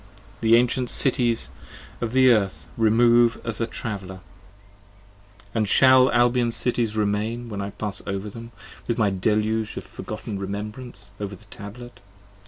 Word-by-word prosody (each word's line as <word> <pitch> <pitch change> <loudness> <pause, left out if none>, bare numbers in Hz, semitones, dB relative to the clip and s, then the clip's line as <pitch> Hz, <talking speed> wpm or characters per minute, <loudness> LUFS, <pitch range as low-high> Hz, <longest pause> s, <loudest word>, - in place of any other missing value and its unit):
The 115 0 +5
ancient 125 +1 +2
Cities 120 -4 +2 0.5
of 115 -2 -2
the 130 0 +5
Earth 100 -5 0
remove 115 +1 +4
as 115 -1 -3
a 115 - 0
traveller, 95 -6 -6 1.1
15 100 - -24
And 110 -3 0
shall 130 +2 +6
Albion's 120 -1 +2
Cities 120 -3 -1
remain 110 +3 -1
when 100 -2 -4
I 100 - -4
pass 100 0 -4
over 100 +1 -3
them, 115 +3 -9 0.4
With 120 - -1
my 105 -4 +2
deluge 110 +3 0
of - - -5
forgotten 100 - -7
remembrances 100 +2 -3
over 100 -1 -5
the 100 - -19
tablet? 105 +1 -10
110 Hz, 145 wpm, -24 LUFS, 100-120 Hz, 1.1 s, shall